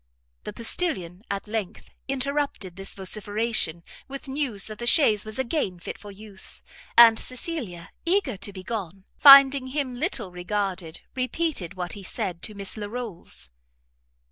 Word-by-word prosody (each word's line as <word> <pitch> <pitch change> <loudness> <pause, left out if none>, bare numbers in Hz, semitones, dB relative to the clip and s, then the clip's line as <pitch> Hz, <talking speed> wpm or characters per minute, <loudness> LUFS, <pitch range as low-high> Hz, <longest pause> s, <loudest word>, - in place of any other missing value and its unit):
The - - -5
postilion, 200 - -1
at 200 +1 -3
length, 210 -2 -4 0.2
interrupted 275 -8 -2
this 195 +1 -6
vociferation 205 -3 -1 0.2
with 275 0 -7
news 265 -7 -1
that 215 -1 -7
the 240 - -3
chaise 220 -7 +5
was 215 +2 -7
again 260 - -1
fit - - -7
for 205 - -10
use; 200 -1 -3 0.3
and 230 -1 +9
Cecilia, 250 - -5
eager 340 - +1
to 200 +1 -4
be 190 -1 -9
gone, 195 -4 -5
finding 275 -2 +9
him 265 -1 -2
little 245 - -2
regarded, 180 -2 -3
repeated 255 - -2
what 180 -1 -3
he 205 - -8
said 180 -2 -4
to 215 - -5
Miss 200 +2 -4
Larolles. 210 - -5
215 Hz, 140 wpm, -25 LUFS, 190-265 Hz, 0.3 s, and